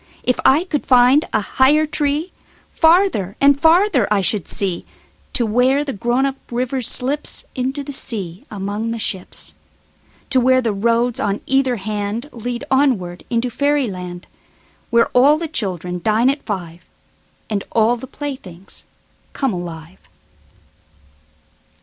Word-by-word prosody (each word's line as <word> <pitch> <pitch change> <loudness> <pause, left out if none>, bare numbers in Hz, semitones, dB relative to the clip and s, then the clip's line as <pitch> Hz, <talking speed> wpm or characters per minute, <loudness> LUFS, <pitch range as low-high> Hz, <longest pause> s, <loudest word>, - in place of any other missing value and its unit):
If 250 - 0
I 295 +6 +4
could 310 -6 -3
find 255 +4 +5
a 215 - +1
higher 280 +8 +3
treeFarther 305 - 0
and 280 0 +4
farther 325 - +3
I 205 -2 +3
should 195 0 0
see, 190 -4 -1 0.5
To 240 - +4
where 250 +6 +2
the 275 -2 -4
grown 240 +6 0
up 275 0 -2
river 250 +2 -2
slipsInto 265 +1 0
the 285 - -6
sea 195 -9 -3
among 205 +2 -4
the 230 - -3
ships. 190 -4 -4 0.8
To 260 - +6
where 255 +1 +4
the 230 -4 -1
roads 235 +4 +1
on 205 -4 -1
either 265 -2 +1
handLead 220 +5 -4
onward 235 -11 +1
into 240 +1 -1
fairy 285 +2 +1
land, 180 -1 -8 0.6
Where 235 0 +3
all 280 +5 +4
the 330 +1 -4
children 180 - -3
dine 225 +4 +3
at 280 - -6
five, 175 -5 -6 0.6
And 205 -3 -2
all 225 +1 +3
the 245 +2 -9
playthings 245 - -8 0.5
come 270 -6 -1
alive. 170 0 -8
240 Hz, 130 wpm, -19 LUFS, 200-275 Hz, 0.8 s, To